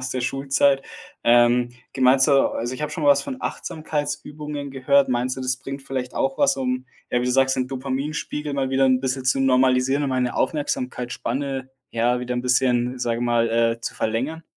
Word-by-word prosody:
aus 130 0 -4
der 130 - -2
Schulzeit. 135 +1 +1 0.4
Ähm. 120 +1 +4 0.2
Ge - - -7
meinst 130 +3 +5
du - - +4
also, 130 -2 +1
ich 130 - -9
habe 150 0 -3
schon 165 - -4
mal 145 - +3
was 140 - +4
von 265 -2 -5
Achtsamkeitsübungen 150 -1 -4
gehört. 135 +1 +3
Meinst 125 +1 -1
du, - - -5
das 130 0 -1
bringt 135 +1 -7
vielleicht 130 -2 -4
auch 135 0 -1
was, - - +3
um, 130 -1 -2 0.2
äh, 120 - +1
wie - - -1
du 125 - 0
sagst, 130 0 +3
den 130 -1 0
Dopaminspiegel 140 +3 -4
mal 135 -1 -1
wieder 135 0 +3
'n 130 -1 +3
bisschen 130 0 -2
zu 135 +1 +2
normalisieren 130 +1 +3
und 135 - -1
meine 125 -1 -1
Aufmerksamkeitsspanne, 130 -1 -2 0.2
ja, 120 +2 +1
wieder 125 0 -3
'n 125 - -2
bisschen, 125 0 +1
sage 120 -1 0
ich 120 - -1
mal, 120 -1 +2
äh, 115 0 +1
zu - - -5
verlängern? 135 +9 -2
130 Hz, 200 wpm, -23 LUFS, 125-140 Hz, 0.4 s, meinst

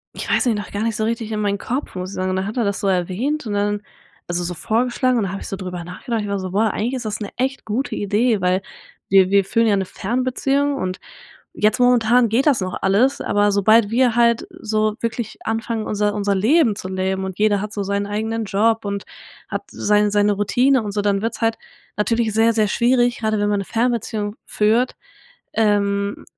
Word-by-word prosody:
ich - - -5
weiß - - +2
nicht, 225 -3 +2
noch 205 - -6
gar 205 - -3
nicht 225 -1 -1
so 220 - -1
richtig 225 0 -2
in 215 - -2
meinen 200 -1 0
Kopf, 260 -1 -4
muss 185 0 -4
ich 200 - -8
sagen 185 0 -1
und - - -1
dann 190 +1 -2
hat 215 - -6
er 240 - +2
das 200 -2 -1
so 200 - -1
erwähnt 195 - -1
und 210 - -3
dann 205 0 0 0.5
also, 175 0 -2
so 175 +1 -3
vorgeschlagen 245 - 0
und 225 - +1
da 190 - -2
hab 195 - -5
ich - - -7
so - - -4
drüber 180 -2 -6
nachgedacht. 220 +7 -4
Ich 205 - -4
war 200 0 -1
so: 185 -1 -5
„Boah, 215 +3 +2
eigentlich 235 +5 -2
ist 250 -3 -4
das 210 -1 -3
'ne 205 -2 -6
echt 265 +2 -2
gute 225 +6 -2
Idee“, 210 +1 +1
weil 180 +1 +2 0.5
wir 190 -1 +5
wir 200 0 +5
führen 230 +4 +1
ja 215 -2 +3
'ne 195 -1 0
Fernbeziehung 255 +7 -1
und 185 -7 -3 0.5
jetzt 215 +4 +1
momentan 245 -1 +4
geht 245 +6 +2
das 280 -7 +4
noch 185 -1 -3
alles, 210 +8 +2
aber 205 0 +2
sobald 210 +2 +4
wir 240 0 +2
halt 235 -1 +3
so 215 -1 0
wirklich 230 -1 -4
anfangen 225 0 -2
unser 210 0 0
unser 200 -1 0
Leben 230 - +3
zu 185 - -7
leben 190 0 -2
und 190 -1 -7
jeder 210 -1 +3
hat 210 +1 -5
so 205 - -2
seinen 200 +1 -1
eigenen 220 +2 -2
Job 215 +2 +1
und 200 0 -3 0.4
hat - - -4
seinen 210 0 +2
seine 205 0 +3
Routine 245 +6 +2
und 205 -1 -4
so, 205 0 -1
dann 200 -1 +1
wird's 225 +2 -4
halt 225 0 +1 0.4
natürlich 225 +1 +1
sehr, 225 +2 +3
sehr 215 -2 +2
schwierig, 240 +1 +2
grade 220 -1 0
wenn 205 0 +1
man - - +2
eine 200 - -2
Fernbeziehung 225 -2 -1
führt, 225 +4 +1 0.6
ähm, 200 -2 +1
210 Hz, 225 wpm, -20 LUFS, 200-230 Hz, 0.6 s, wir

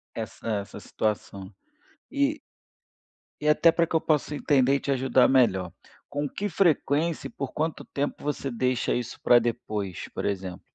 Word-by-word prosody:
Essa - - -6
essa 100 0 -7
situação, 100 -3 -3 0.6
e 285 +1 +1 1.0
e 150 - +2
até 165 +2 +5
para 170 0 +1
que 165 - -3
eu - - +5
possa 150 -1 0
entender 135 -2 +3
e - - +1
te 140 - -2
ajudar 130 -1 +4
melhor. 95 -9 +2 0.3
Com 145 0 -3
que 205 - -3
frequência 165 -4 +1
e - - -14
por 140 - -5
quanto 160 +1 -2
tempo 145 +1 -4
você 145 -2 -2
deixa 125 +1 0
isso 120 -1 -4
para 120 - +6
depois, 105 -5 -3
por - - -4
exemplo? 95 -3 -3
135 Hz, 160 wpm, -26 LUFS, 115-150 Hz, 1.0 s, para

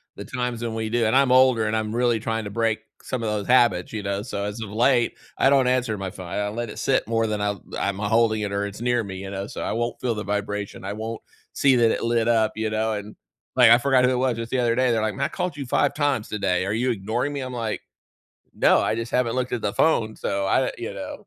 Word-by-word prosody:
the - - -8
times 125 -2 -3
when 115 -1 -3
we 110 -1 -2
do 120 0 +1
and 110 - +2
I'm 135 -1 +4
older, 130 -3 +5
and 110 - 0
I'm 110 -1 -2
really 120 -2 +2
trying 110 0 -2
to - - -4
break 115 +1 0 0.2
some 125 -3 -3
of 110 - -1
those 105 -1 -2
habits, 120 -8 +3
you 105 -2 -4
know? 100 0 -2
So, 105 -4 -4
as 105 +2 -5
of 110 - -5
late, 120 +2 +2 0.2
I 135 - +4
don't 135 -2 +4
answer 125 -4 +1
my 95 -1 -4
phone, 95 -2 -9
I 85 - -4
I 105 0 -1
let 115 +2 -4
it - - -8
sit 135 - +1
more 115 0 +1
than 105 -1 -2
I'm 105 -2 -2 0.2
I'm 100 -1 -1
holding 110 +1 +2
it 100 -1 -3
or 100 0 -1
it's 100 +2 -7
near 120 -1 +1
me, 95 -2 -7
you 95 +1 -7
know? 100 0 -4
So - - -7
I - - -2
won't 120 +2 -2
feel 120 -3 0
the 105 - -4
vibration, 105 -1 -3
I 100 - -3
won't 110 +1 -5 0.3
see 135 -2 +4
that 115 -2 +4
it - - -2
lit 115 -1 +1
up, 110 -2 +2
you 110 0 -1
know? 110 +1 0
And, 105 0 -6 0.4
like, 125 -3 +7
I 120 - +9
forgot 130 -1 +3
who 125 - +3
it - - +1
was 125 -2 0
just 115 0 -5
the 130 - +1
other 120 -1 +2
day, 130 0 +2
they're 115 -1 +1
like, 110 -1 -1
"Man, 135 +1 -1
I - - -2
called 180 -4 -3
you 140 - -4
5 140 +3 +1
times 145 -7 0
today, 95 -3 0
are 100 - -1
you 125 +3 +1
ignoring 115 +7 -2
me?" 140 - -3
I'm 130 -1 -5
like, 115 -3 -3 0.7
"No, - - +4
I - - 0
just 115 +1 -4
haven't 125 -2 +1
looked 125 0 -2
at 120 - -2
the 100 - -1
phone." 110 -8 +2
So 100 0 -2
I 95 - +2
d - - -3
you - - -5
know? - - -8
115 Hz, 280 wpm, -24 LUFS, 105-125 Hz, 0.7 s, I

